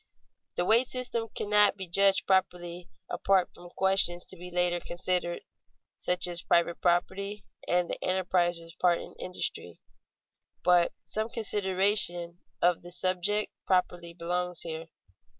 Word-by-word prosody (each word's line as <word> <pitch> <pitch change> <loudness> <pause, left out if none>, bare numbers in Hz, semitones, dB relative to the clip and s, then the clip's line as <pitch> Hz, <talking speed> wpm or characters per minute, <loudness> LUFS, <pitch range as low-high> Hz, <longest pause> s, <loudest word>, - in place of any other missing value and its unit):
The 175 - 0
wage 235 +5 +6
system 245 -3 -2
cannot 210 0 +4
be 190 -2 -5
judged 195 +3 +4
properly 180 -2 -1 0.2
apart 190 -2 +1
from 175 - -13
questions 190 -2 +2
to - - -6
be 180 0 -10
later 175 0 +1
considered, 175 0 -2 0.6
such 180 0 +2
as 175 -1 0
private 170 0 +1
property 190 +3 -1 0.2
and 175 0 +1
the - - -4
enterpriser's 175 -2 0
part 175 -1 +1
in - - -10
industry; 90 - -4 0.8
but 175 -1 +4
some 220 +1 -2
consideration 190 -5 +1 0.2
of 175 -1 +3
the 175 - -11
subject 185 +4 0 0.2
properly 175 -2 0
belongs 180 +1 -3
here. 160 -1 -5
180 Hz, 130 wpm, -28 LUFS, 175-195 Hz, 0.8 s, wage